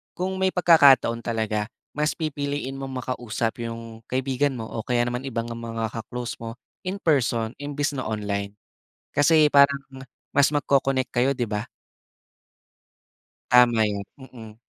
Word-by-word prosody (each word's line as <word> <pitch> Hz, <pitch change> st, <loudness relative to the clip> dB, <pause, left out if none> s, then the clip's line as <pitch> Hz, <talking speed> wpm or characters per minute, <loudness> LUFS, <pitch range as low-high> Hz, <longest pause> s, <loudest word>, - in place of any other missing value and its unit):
kung 190 Hz, +1 st, -2 dB
may 190 Hz, 0 st, +2 dB
pagkakataon 140 Hz, -10 st, +5 dB
talaga, 110 Hz, -2 st, -1 dB, 0.3 s
mas 150 Hz, +1 st, +1 dB
pipiliin 145 Hz, -3 st, -3 dB
mong 135 Hz, -2 st, -5 dB
makausap 115 Hz, 0 st, -3 dB
yung 115 Hz, -1 st, -7 dB
kaibigan 130 Hz, 0 st, 0 dB
mo 110 Hz, -, -5 dB
o 110 Hz, 0 st, -5 dB
kaya 120 Hz, -1 st, +1 dB
naman 125 Hz, +2 st, -3 dB
ibang 115 Hz, -2 st, -3 dB
mga 115 Hz, -1 st, -4 dB
ka-close 120 Hz, +1 st, -5 dB
mo 115 Hz, 0 st, -6 dB, 0.3 s
in-person 135 Hz, -, 0 dB
imbes 145 Hz, 0 st, -2 dB
na 130 Hz, -, -3 dB
online, 100 Hz, -2 st, -3 dB, 0.7 s
kasi 150 Hz, +1 st, +5 dB
parang 140 Hz, -1 st, +5 dB, 0.5 s
mas 140 Hz, 0 st, +5 dB
mag-co-connect 135 Hz, -2 st, +1 dB
kayo, 130 Hz, +3 st, +2 dB
'di 120 Hz, -4 st, -3 dB
ba? 105 Hz, +1 st, -2 dB, 1.9 s
Tama 120 Hz, -2 st, +6 dB
yan, 100 Hz, -1 st, -2 dB
mm. 115 Hz, -5 st, -12 dB
125 Hz, 130 wpm, -24 LUFS, 115-140 Hz, 1.9 s, Tama